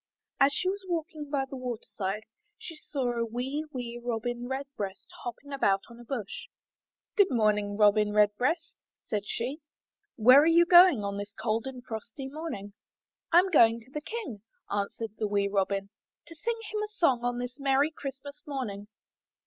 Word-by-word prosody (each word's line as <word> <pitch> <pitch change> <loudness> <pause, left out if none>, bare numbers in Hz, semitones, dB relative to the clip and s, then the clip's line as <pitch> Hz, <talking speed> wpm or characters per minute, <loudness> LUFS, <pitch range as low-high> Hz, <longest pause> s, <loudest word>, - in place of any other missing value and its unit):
As 275 +1 +6
she 365 - -1
was 390 +1 -1
walking 315 -4 -3
by 280 -2 0
the 270 - -7
water 250 -3 -5
side, 200 +1 -2 0.3
she 330 - -8
saw 275 -5 -2
a 235 -1 -1
wee, 255 +6 -3
wee 240 -3 -5
Robin 240 +1 -2
Redbreast 265 -8 -5 0.2
hopping 280 +4 -7
about 195 -8 +2
on 235 - -13
a - - -10
bush. 235 -5 -5 0.7
''Good 405 -3 +5
morning, 210 -3 +1
Robin 210 0 +4
Redbreast," 245 +11 +1 0.3
said 205 -1 -2
she, 255 +6 -3 0.6
"Where 255 +5 +8
are 310 - +3
you 335 +1 +6
going 350 - +7
on 200 0 -3
this 205 0 -6
cold 225 +2 -1
and 255 -2 -8
frosty 225 +3 -6
morning?" 270 -9 -6 0.6
'Tm 360 +3 +5
going 230 -7 +6
to 245 +4 -19
the 300 - -4
King," 380 - -6 0.3
answered 205 +2 -2
the 215 - +1
wee 200 -1 +1
Robin, 195 0 -1 0.3
to 330 - -11
sing 460 +8 -2
him 425 0 -1
a 425 - -2
song 280 - +1
on 245 0 0
this 245 +2 -5
merry 275 +2 +3
Christmas 280 0 -8
morning." 215 -8 -4
245 Hz, 170 wpm, -29 LUFS, 210-290 Hz, 0.7 s, Where